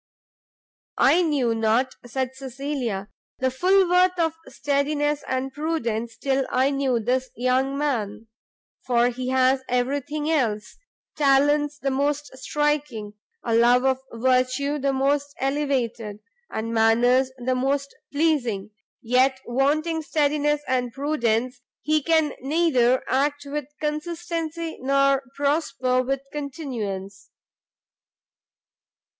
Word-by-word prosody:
"I 360 - +5
knew 285 -8 +1
not," 225 +4 +1
said 260 +1 -2
Cecilia, 265 -6 -4 0.3
"the 260 0 0
full 370 +8 +3
worth 365 +1 +3
of 325 -2 +1
steadiness 290 +1 0
and 260 +1 -2
prudence 235 -7 -2
till 270 -1 0
I 260 +2 +2
knew 270 -3 +1
this 255 +3 -1
young 260 +3 +1
man; 225 -7 -2 0.6
for 240 -1 +3
he 250 +1 -5
has 260 0 +3
every 250 +3 0
thing 295 +2 -4
else; 235 -9 -1 0.4
talents 290 +1 +3
the 275 -2 -2
most 285 +1 -1
striking, 285 -7 -2 0.3
a 230 - 0
love 240 +2 +4
of 265 -1 +2
virtue 255 +4 +1
the 275 0 +1
most 280 +2 0
elevated, 260 -7 -1 0.3
and 225 +1 -4
manners 245 +4 +3
the 255 +1 -1
most 275 +2 -1 0.2
pleasing; 250 -10 0 0.3
yet 260 +3 +3
wanting 305 +6 +1
steadiness 295 -1 +1
and 250 -2 0
prudence, 255 -3 -1 0.2
he 310 +1 +2
can 315 0 +2
neither 265 -4 +2
act 285 +2 0
with 290 0 -4
consistency 330 +1 -3
nor 275 +1 +3
prosper 280 -3 +1
with 270 +1 -2
continuance." 225 - -5
270 Hz, 115 wpm, -24 LUFS, 250-295 Hz, 0.6 s, I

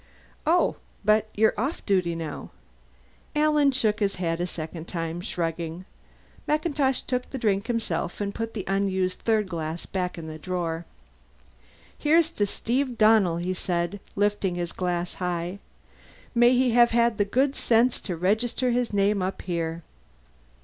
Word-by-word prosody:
"Oh, 345 +3 +3 0.3
but 215 +1 +3
you're 220 +1 +4
off 270 +8 -2
duty 180 -4 +1
now!" 160 -3 -5 0.9
Alan 300 -2 +4
shook 220 -5 +1
his 200 -2 +1
head 170 -2 -1
a 175 - 0
second 165 0 -6
time; 165 0 -3
shrugging, 170 0 -3 0.6
MacIntosh 295 -4 +1
took 250 -1 -3
the 270 - -5
drink 205 -4 0
himself 215 -8 -2
and 200 -1 -2
put 225 0 -4
the 200 - -3
unused 190 -1 0
third 220 -3 +1
glass 165 -2 -4
back 180 -2 -3
in 165 - -6
the 155 0 -7
drawer. 170 -1 -3 1.1
"Here's 325 +2 +3
to 205 -10 0
Steve 250 +4 -1
Donnell!" 215 -6 +5
he 180 +2 -1
said, 180 +1 -2 0.2
lifting 205 -2 +1
his 175 -1 -3
glass 175 -1 -2
high. 180 +1 -3 0.7
"May 240 0 +5
he 250 0 +3
have 240 0 +6
had 235 -1 +2
the - - +5
good 265 +7 +1
sense 235 +1 +2
to 180 -4 -4
register 225 +7 +1
his 245 0 0
name 200 0 +2
up 185 +1 -3
here!" 170 -2 -3
200 Hz, 150 wpm, -26 LUFS, 175-235 Hz, 1.1 s, have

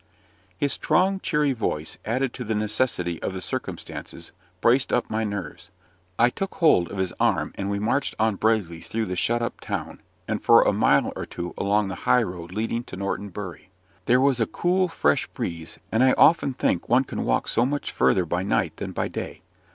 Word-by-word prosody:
His 140 +6 0
strong, 185 +5 +2
cheery 150 -5 +1
voice, 80 -10 -3
added 125 +3 0
to 125 - -6
the 110 -1 -2
necessity 105 -5 -1
of 95 - -3
the - - -3
circumstances, 90 - -5 0.3
braced 125 +7 +3
up 125 - 0
my 110 +1 0
nerves. 95 -4 -5 0.5
I 120 +1 +4
took 195 +7 -4
hold 150 - +4
of 100 - -7
his 95 -1 -1
arm, - - +1
and 100 0 -4
we 100 - -1
marched 115 +7 0
on 110 0 +2
bravely 100 -7 0
through 110 0 -3
the 90 -2 -3
shut 120 +6 0
up 115 - -4
town, - - -5 0.3
and - - -2
for - - +7
a - - +2
mile - - +3
or - - -5
two 85 0 -6
along 100 0 +1
the - - -4 0.2
high 125 - +5
road 90 -3 -7
leading 115 +4 -2
to - - -9
Norton 100 +1 -3
Bury. 95 -1 -8 0.4
There 125 +1 +4
was 135 -2 +3
a 110 - +2
cool 185 +1 +1
fresh 165 - +1
breeze: 80 -1 -5
and 115 +3 +3
I 130 - +5
often 145 -5 +4
think 85 - 0
one 125 +3 +5
can - - -4
walk - - 0
so 115 - +2
much 145 +3 -2
further 90 - +2
by 90 +2 -1
night 95 - 0
than - - -5
by - - -1
day. - - -6
110 Hz, 200 wpm, -25 LUFS, 95-130 Hz, 0.5 s, for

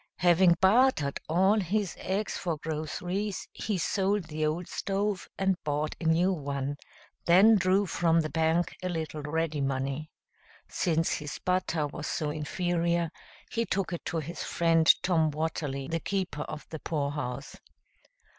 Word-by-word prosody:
Having 175 0 +5
bartered 190 - +3
all 190 +6 +4
his 200 0 -1
eggs 195 +3 -2
for 170 -4 -2
groceries, 175 +6 -3
he 210 -3 -2
sold 195 +3 +1
the 155 -1 -4
old 165 +3 -2
stove 200 -1 -2
and 190 -1 0
bought 150 +1 -1
a - - -4
new 170 +4 +3
one, 140 -3 -3 0.5
then 195 +6 +7
drew 190 +1 +3
from 165 -2 +2
the 155 - -3
bank 160 +2 +1
a 185 - -2
little 160 -3 -3
ready 155 0 -1
money. 135 +3 -2 0.6
Since 165 -1 0
his 150 -1 -4
butter 180 -4 +1
was 150 +1 -5
so 150 -2 -1
inferior, 170 +2 0 0.4
he 230 - 0
took 190 -3 -1
it 170 - -5
to 170 - -2
his 165 +2 -5
friend 165 -1 +4
Tom 160 -4 +3
Watterly, 150 -3 -3
the 165 +2 -1
keeper 185 -5 -2
of 155 -1 -7
the 160 - -6
poorhouse. 145 -5 -3
165 Hz, 145 wpm, -29 LUFS, 155-185 Hz, 0.6 s, then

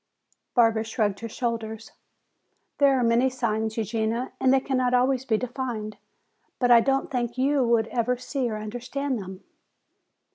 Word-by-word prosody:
Barbara 225 -3 +4
shrugged 215 -3 -1
her 230 - -6
shoulders. 225 -2 -4 0.9
"There 275 -2 +4
are - - +1
many 235 +3 +3
signs, 220 -3 -2
Eugenia, 225 +3 -1
and 260 - +3
they 270 - +5
cannot 255 -2 0
always 255 +1 +2
be 225 -5 +2
defined. 240 -4 -4 0.6
But 245 -1 +2
I 235 - +9
don't 270 +5 0
think 240 -2 -2
you 275 +1 +2
would 235 -2 +2
ever 245 +1 0
see 255 0 -2
or 215 - -3
understand 245 +5 -4
them." 190 0 -9
240 Hz, 150 wpm, -25 LUFS, 220-260 Hz, 0.9 s, I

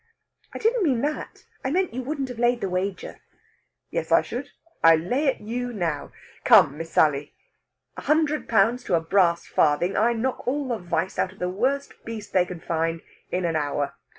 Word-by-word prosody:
"I - - -6
didn't 460 +1 +1
mean 265 -10 +2
that. 295 +2 -4 0.2
I 265 - -1
meant 365 +2 0
you 255 - -3
wouldn't 275 0 -3
have 245 -2 -7
laid 240 0 +2
the 195 - -1
wager." 185 +1 -3 0.7
"Yes, - - -3
I - - +5
should. - - -6 0.3
I 165 0 +8
lay 245 - 0
it 270 - 0
you 245 +3 -3
now! 170 -9 -3 0.3
Come, 140 - +6
Miss 165 0 -5
Sally! 145 -2 +2 0.6
a - - -7
hundred 305 -1 +1
pounds 235 +2 +3
to 175 - +2
a - - +3
brass 170 0 +2
farthing 160 +5 +2
I 230 +3 +3
knock 245 +3 -3
all 275 +1 -1
the 235 -3 -1
vice 175 0 -2
out 185 - +1
of - - -21
the 180 -1 -2
worst 270 +9 -2
beast 225 -2 -7
they 180 -1 +4
can 180 -2 -8
find 165 0 -1 0.3
in 180 0 -1
an 165 -1 0
hour. 145 -1 -1
210 Hz, 195 wpm, -25 LUFS, 170-260 Hz, 0.7 s, I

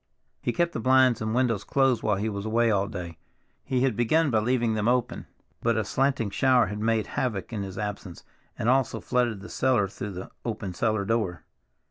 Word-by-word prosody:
He - - 0
kept 170 +4 0
the - - -3
blinds 130 0 +4
and 110 +1 -1
windows 115 -6 +1
closed 135 -4 +2
while 105 - +1
he 100 +3 -2
was 100 -2 -3
away 115 +1 +2
all 100 -1 +1
day; 90 -6 -7 0.4
he 130 -2 -1
had 130 -4 +2
begun 140 +7 +2
by 110 - +3
leaving 120 0 +1
them 110 0 -1
open, 125 0 0 0.3
but 115 -1 +1
a 110 - +1
slanting 130 -4 0
shower 130 +2 +4
had 105 +3 -5
made 110 0 +1
havoc 115 -3 -3
in 105 - -2
his 95 -1 -6
absence 105 -4 -5 0.3
and - - -2
also 130 +1 +2
flooded 120 -5 0
the 105 - -9
cellar 125 -6 +2
through 100 +1 -7
the 90 +1 -8
open 105 -5 -4
cellar 110 +1 0
door. 105 -5 -1
115 Hz, 200 wpm, -26 LUFS, 105-125 Hz, 0.4 s, blinds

